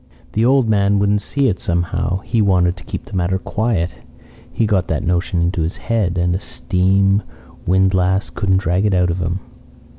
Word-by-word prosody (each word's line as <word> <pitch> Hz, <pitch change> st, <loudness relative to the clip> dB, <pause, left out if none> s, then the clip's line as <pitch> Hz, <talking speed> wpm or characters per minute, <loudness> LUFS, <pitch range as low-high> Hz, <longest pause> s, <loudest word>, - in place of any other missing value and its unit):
"The 110 Hz, -, 0 dB
old 130 Hz, 0 st, +3 dB
man 100 Hz, -1 st, +2 dB
wouldn't 100 Hz, +1 st, +2 dB
see 140 Hz, +5 st, 0 dB
it 95 Hz, -6 st, -1 dB
somehow. 85 Hz, +2 st, -1 dB
He 115 Hz, -, 0 dB
wanted 90 Hz, -3 st, +2 dB
to -, -, -12 dB
keep -, -, -6 dB
the -, -, -9 dB
matter 90 Hz, +1 st, 0 dB
quiet. 95 Hz, -4 st, -1 dB, 0.6 s
He 115 Hz, -, 0 dB
got 100 Hz, -4 st, +1 dB
that -, -, -2 dB
notion 90 Hz, -1 st, 0 dB
into 85 Hz, 0 st, 0 dB
his 80 Hz, +3 st, -2 dB
head, 105 Hz, -7 st, -1 dB
and 90 Hz, 0 st, +1 dB
a -, -, -2 dB
steam 95 Hz, +1 st, +1 dB, 0.5 s
windlass 95 Hz, +1 st, +2 dB
couldn't 95 Hz, -3 st, +1 dB
drag 95 Hz, +2 st, 0 dB
it 100 Hz, -, +1 dB
out 90 Hz, -1 st, +2 dB
of 90 Hz, -, -3 dB
him. 90 Hz, +2 st, -2 dB
95 Hz, 185 wpm, -18 LUFS, 90-100 Hz, 0.6 s, old